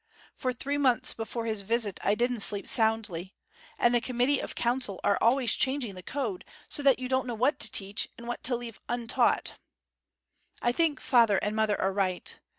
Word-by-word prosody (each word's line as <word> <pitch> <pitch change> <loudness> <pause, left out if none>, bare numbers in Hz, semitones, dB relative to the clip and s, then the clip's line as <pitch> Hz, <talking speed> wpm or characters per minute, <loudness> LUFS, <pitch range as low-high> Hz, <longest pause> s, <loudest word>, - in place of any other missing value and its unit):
For 255 - -2
three 280 +4 -3
months 255 -5 +2
before 230 +1 -5
his 220 -3 -1
visit 215 -1 -1
I 205 - +2
didn't 245 +1 0
sleep 205 0 0
soundly. 220 -5 +1 0.4
And 240 - +3
the 240 - +3
Committee 255 +3 +1
of - - -6
Council 240 -5 0
are 200 - +3
always 245 +1 +3
changing 265 -5 0
the 185 - -9
Code, 220 -3 -4 0.2
so - - -4
that 275 -2 +4
you 255 0 -5
don't 260 0 0
know 240 - -3
what 255 +7 +1
to - - +3
teach, 200 +2 0
and 235 - -10
what 240 - -4
to 250 - +3
leave 235 -3 -7
untaught. 240 -1 0 1.0
I 240 - +1
think 300 0 +1
father 230 -6 +4
and 210 +1 -1
mother 220 -1 +1
are 190 - 0
right. 185 -2 -2
235 Hz, 190 wpm, -28 LUFS, 210-255 Hz, 1.0 s, that